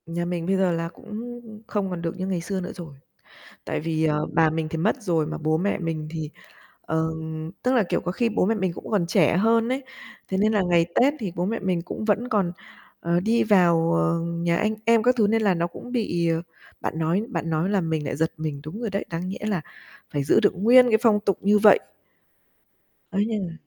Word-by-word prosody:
Nhà 170 Hz, +1 st, -3 dB
mình 175 Hz, -1 st, -3 dB
bây 195 Hz, +2 st, +1 dB
giờ 190 Hz, -2 st, +2 dB
là 165 Hz, 0 st, -2 dB
cũng 240 Hz, +3 st, -8 dB, 0.3 s
không 200 Hz, -3 st, -2 dB
còn 180 Hz, -2 st, -4 dB
được 170 Hz, +2 st, -4 dB
như 185 Hz, 0 st, -3 dB
ngày 185 Hz, -3 st, -1 dB
xưa 190 Hz, +2 st, -3 dB
nữa 180 Hz, -, -5 dB
rồi. 165 Hz, -6 st, -9 dB, 0.7 s
Tại -, -, -2 dB
vì, 160 Hz, 0 st, -1 dB
ờ, 150 Hz, -1 st, +1 dB
bà 160 Hz, 0 st, +4 dB
mình 160 Hz, 0 st, -2 dB
thì 165 Hz, -, -4 dB
mất 215 Hz, +10 st, 0 dB
rồi 165 Hz, -5 st, +1 dB
mà -, -, -4 dB
bố 155 Hz, 0 st, 0 dB
mẹ 200 Hz, +5 st, 0 dB
mình 160 Hz, -3 st, -3 dB
thì, 160 Hz, -2 st, -4 dB, 0.5 s
ờm 160 Hz, 0 st, -3 dB
tức 250 Hz, -, +2 dB
là, 240 Hz, -, +4 dB
kiểu, -, -, 0 dB
có 180 Hz, -, -3 dB
khi 235 Hz, +5 st, +1 dB
bố 220 Hz, -4 st, +1 dB
mẹ 225 Hz, -, +2 dB
mình 190 Hz, -4 st, -1 dB
cũng -, -, -9 dB
còn 200 Hz, -6 st, +1 dB
trẻ 170 Hz, -3 st, +3 dB
hơn 225 Hz, +4 st, +3 dB
ấy, 260 Hz, +2 st, -1 dB, 0.5 s
thế 190 Hz, -, -1 dB
nên 215 Hz, +2 st, +3 dB
là 210 Hz, -3 st, +2 dB
ngày 175 Hz, -2 st, +3 dB
Tết 275 Hz, +4 st, +4 dB
thì 200 Hz, -6 st, -4 dB
bố 175 Hz, -, 0 dB
mẹ 225 Hz, +3 st, -1 dB
mình 185 Hz, -3 st, -1 dB
cũng 185 Hz, -, -6 dB
vẫn 220 Hz, +3 st, +1 dB
còn, 200 Hz, -7 st, +1 dB, 0.5 s
ờ, 170 Hz, +1 st, +1 dB
đi 225 Hz, +5 st, +2 dB
vào, 170 Hz, -5 st, +4 dB
ờ, 170 Hz, 0 st, +1 dB
nhà 170 Hz, 0 st, -1 dB
anh 215 Hz, +4 st, 0 dB
em 230 Hz, 0 st, +4 dB
các 250 Hz, +3 st, +4 dB
thứ 220 Hz, -4 st, +4 dB
nên 225 Hz, +2 st, +1 dB
là 200 Hz, -3 st, +3 dB
nó 170 Hz, 0 st, 0 dB
cũng 245 Hz, +8 st, -10 dB
bị, 175 Hz, -8 st, 0 dB
ờ 165 Hz, 0 st, 0 dB, 0.4 s
bạn 160 Hz, -, -3 dB
nói 165 Hz, +5 st, +1 dB
bạn 165 Hz, -9 st, -3 dB
nói 160 Hz, +3 st, 0 dB
làm 185 Hz, -5 st, 0 dB
mình 155 Hz, -2 st, -1 dB
lại 145 Hz, -, -3 dB
giật 160 Hz, +2 st, 0 dB
mình, 155 Hz, -3 st, -4 dB
đúng 170 Hz, +9 st, -7 dB
rồi 230 Hz, -3 st, -3 dB
đấy, 200 Hz, +1 st, -2 dB
đáng 170 Hz, +2 st, -3 dB
nhẽ 190 Hz, -, -5 dB
là 195 Hz, -5 st, 0 dB, 0.5 s
phải 145 Hz, -1 st, -2 dB
giữ 140 Hz, -, +4 dB
được -, -, +3 dB
nguyên 245 Hz, +6 st, +6 dB
cái 220 Hz, -2 st, +4 dB
phong 215 Hz, -3 st, +4 dB
tục 200 Hz, -2 st, 0 dB
như 205 Hz, +1 st, +4 dB
vậy. 210 Hz, 0 st, +7 dB, 1.3 s
Ấy, 200 Hz, 0 st, 0 dB
nên 215 Hz, -4 st, -2 dB
là 165 Hz, -, -8 dB
180 Hz, 240 wpm, -24 LUFS, 165-215 Hz, 1.3 s, vậy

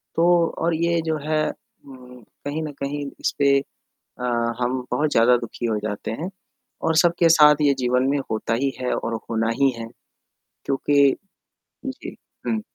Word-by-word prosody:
तो 170 Hz, 0 st, +4 dB
और 170 Hz, 0 st, 0 dB
ये 170 Hz, +1 st, +1 dB
जो 160 Hz, -1 st, 0 dB
है 155 Hz, -1 st, +1 dB
उम, 125 Hz, -2 st, -14 dB, 0.2 s
कहीं 155 Hz, +2 st, -2 dB
न 150 Hz, -, -4 dB
कहीं 145 Hz, +1 st, -3 dB
इसपे 140 Hz, -1 st, +2 dB, 0.6 s
अ, 125 Hz, -, -3 dB, 0.4 s
हम 125 Hz, +1 st, 0 dB
बहुत 150 Hz, 0 st, +1 dB
ज़्यादा 120 Hz, +2 st, +5 dB
दु:खी 120 Hz, 0 st, -5 dB
हो 110 Hz, -2 st, 0 dB
जाते 105 Hz, 0 st, -4 dB
हैं 175 Hz, -, -3 dB, 0.6 s
और 160 Hz, -1 st, +2 dB
सबके 170 Hz, 0 st, +4 dB
साथ 150 Hz, -2 st, +7 dB
ये 140 Hz, -1 st, +4 dB
जीवन 125 Hz, 0 st, +1 dB
में 145 Hz, -, +1 dB
होता 110 Hz, +1 st, -1 dB
ही 135 Hz, +4 st, 0 dB
है 125 Hz, -, -1 dB
और 115 Hz, -, -3 dB, 0.2 s
होना 115 Hz, 0 st, 0 dB
ही 135 Hz, -, +5 dB
है 115 Hz, -, -5 dB, 0.8 s
क्योंकि 140 Hz, 0 st, +3 dB, 0.7 s
जी, -, -, -7 dB, 0.3 s
हुँ। 220 Hz, -1 st, 0 dB
140 Hz, 160 wpm, -23 LUFS, 125-160 Hz, 0.8 s, साथ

